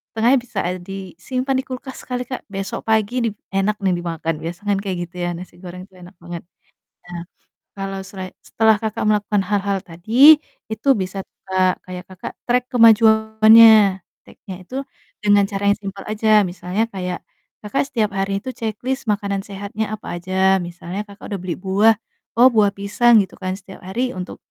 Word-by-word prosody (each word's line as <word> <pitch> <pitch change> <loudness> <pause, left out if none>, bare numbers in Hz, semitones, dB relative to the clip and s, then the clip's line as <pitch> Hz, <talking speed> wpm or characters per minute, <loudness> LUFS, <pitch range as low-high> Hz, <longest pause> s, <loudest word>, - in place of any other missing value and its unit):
setengah 230 +3 +3
bisa 230 -5 -6 0.2
disimpan 195 +8 -4
di - - -3
kulkas 260 +1 -7
kali 250 0 -2
Kak, 255 +1 -6
besok 195 +1 -5
pagi 220 +2 +1
di - - +1 0.2
enak 195 +2 +1
nih 190 - +3
dimakan, 165 -1 -3
biasa 175 +4 -7
kan 200 -1 +1
kayak 195 -2 -3
gitu 175 +2 -24
ya 175 0 -1
nasi 180 0 -11
goreng 180 0 -9
tuh 185 -2 -20
enak 180 +2 -14
banget. 175 -1 -6 0.7
Nah 175 -1 -6 0.5
kalau 195 -1 -5
selai 190 -1 -9
setelah, 220 -1 +3
Kakak, 220 -1 -3
melakukan 210 -1 +1
hal-hal 200 -1 0
tadi 230 - +6 0.3
itu 220 +5 -4
bisa 195 -2 -4
tuh - - -60
Kak, 185 -1 +3 0.2
kayak, 180 0 -6
Kakak, 185 -1 -8
track 245 0 +2
kemajuannya 220 -3 +6 0.2
track-nya 190 -2 -11
itu 255 +8 -9 0.5
dengan 205 -1 +5
cara 200 0 -4
yang - - -16
simpel 195 -1 -7
aja 215 -1 +3
misalnya 180 +4 -2
kayak, 180 -2 -4 0.5
Kakak, 240 - 0
setiap 215 -4 0
hari 195 0 -1
itu 260 - -4
checklist 235 +3 -4
makanan 200 -1 -1
sehatnya 205 +2 -5
apa 175 -4 -7
aja 190 +1 +2
misalnya, 175 +2 -6
Kakak, 200 +1 -11
udah 195 - -3
beli 180 -2 -4
buah. 200 +4 +3 0.4
Oh, 250 - +8
buah 205 -3 +3
pisang 220 +4 +4
gitu - - -15
kan 185 -1 -2
setiap 195 -1 -13
hari 235 +8 -2
untuk 180 0 -7
200 Hz, 170 wpm, -20 LUFS, 185-220 Hz, 0.7 s, Oh